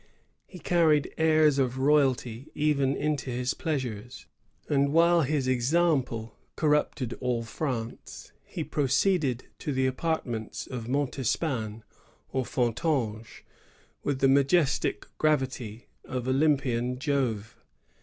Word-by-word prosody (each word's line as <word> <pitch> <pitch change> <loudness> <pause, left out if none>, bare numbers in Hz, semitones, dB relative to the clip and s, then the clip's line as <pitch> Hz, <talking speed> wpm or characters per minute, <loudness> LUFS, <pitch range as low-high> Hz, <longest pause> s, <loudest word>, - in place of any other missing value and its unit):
He 185 - -11
carried 160 -4 +2
aiis 155 -3 +4
of 130 -1 0
royalty 130 -3 +1
even 140 -3 +1
into 150 -4 -1
his 125 +1 -1
pleasures; 125 -7 -4 0.4
and 140 -1 +2
while 170 +2 +5
his 140 -2 0
example 130 -4 +1 0.2
corrupted 150 -5 +1
all 125 -2 0
France, 115 -1 -5
he - - -5
proceeded 140 -1 +1
to 150 - -3
the 130 -1 +1
apartments 125 -7 -2
of 120 -2 -6
Montespan 125 -4 -1 0.5
or 130 -1 -1
Fontanges 120 -3 -1 0.6
with 140 -2 -1
the 135 - +5
majestic 140 +2 +2
gravity 130 -7 0 0.2
of 125 -1 -4
Oljonpian 130 -3 +1
Jove. 125 -6 -1
135 Hz, 105 wpm, -28 LUFS, 120-150 Hz, 0.6 s, while